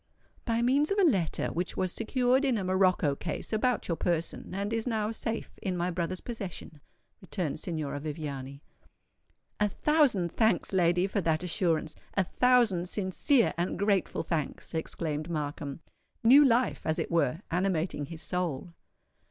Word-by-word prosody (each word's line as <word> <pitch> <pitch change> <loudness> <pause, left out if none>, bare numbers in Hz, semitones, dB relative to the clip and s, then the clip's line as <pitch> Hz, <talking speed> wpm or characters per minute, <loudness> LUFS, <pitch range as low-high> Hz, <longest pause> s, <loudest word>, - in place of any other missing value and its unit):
"By 230 -1 +1
means 275 +5 +3
of 400 - +1
a 400 - +4
letter 195 - +2
which 175 +1 -3
was 185 -1 0
secured 250 +5 +1
in 260 -4 +2
a 200 - -2
morocco 185 -5 +2
case 165 +8 -5
about 235 +1 +1
your 170 - 0
person, 170 -2 -2
and 200 +3 -2
is 225 +1 -1
now 220 -2 0
safe 225 0 -4
in 185 -3 -2
my 175 +1 0
brother's 180 +1 -3
possession," 190 -9 -7 0.4
returned 180 -5 -3
Signora 155 -5 -3
Viviani. 140 -2 -6 1.0
"A 210 -1 +3
thousand 255 - +2
thanks, 220 -3 +1
lady, 175 0 +3
for 200 +1 -1
that 160 -1 +1
assurance—a 170 0 -1
thousand 220 -5 +3
sincere 210 +7 +2
and 175 - -1
grateful 200 -2 +1
thanks!" 155 -1 -3
exclaimed 160 -1 -3
Markham, 145 -2 -4 0.4
new 265 +6 +8
life 250 -2 +2
as 155 - +1
it - - -3
were 165 -1 +1
animating 175 -4 0
his 165 -1 -8
soul. 175 -2 -3
185 Hz, 150 wpm, -29 LUFS, 165-225 Hz, 1.0 s, new